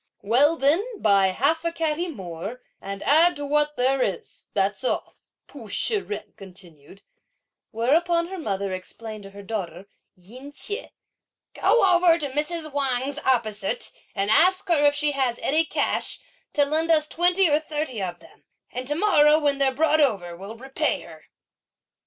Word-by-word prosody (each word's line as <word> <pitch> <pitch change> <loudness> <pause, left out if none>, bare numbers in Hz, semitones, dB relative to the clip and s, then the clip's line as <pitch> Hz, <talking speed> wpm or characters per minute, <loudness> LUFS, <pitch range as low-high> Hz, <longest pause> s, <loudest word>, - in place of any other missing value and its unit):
"Well, 265 +10 +4
then, 385 - +1
buy 200 -2 +4
half 280 - 0
a 335 - -1
catty 330 +1 -1
more, 200 - -7 0.2
and 195 0 -6
add 330 +5 +4
to 290 - -5
what 295 +1 +1
there 260 +1 +2
is, 195 -7 -4
that's 200 +4 0
all," 255 - -2 0.3
Pu 235 -7 -12
Shih 425 - 0
jen 210 - -7
continued; 185 -2 -13 0.7
whereupon 335 +9 +1
her 380 -1 -6
mother 200 - -3
explained 215 +4 -7
to - - -9
her 200 +1 -12
daughter, 190 -4 -5 0.3
Yin 245 +10 -12
Chieh, 415 +10 -5 0.6
"Go 475 - +3
over 350 -2 +5
to 295 -4 -3
Mrs. 310 +2 -2
Wang's 275 0 -1
opposite, 215 -7 -1 0.2
and 200 +1 0
ask 370 - +3
her 325 -4 +3
if 290 0 +4
she 295 0 +1
has 260 -4 0
any 315 +3 +2
cash, - - -1 0.3
to 290 -1 +3
lend 315 +3 -1
us 310 -2 +4
twenty 355 +3 +3
or 300 -1 +3
thirty 300 -7 -4
of 180 -2 -4
them; - - -20 0.3
and 250 +1 -5
to 295 - -1
morrow, 305 -5 +5
when 290 -2 0
they're 270 -1 +3
brought 310 +3 +2
over, 195 -11 0
we'll 200 +6 -9
repay 265 +3 -2
her." - - -14
275 Hz, 165 wpm, -24 LUFS, 205-315 Hz, 0.7 s, over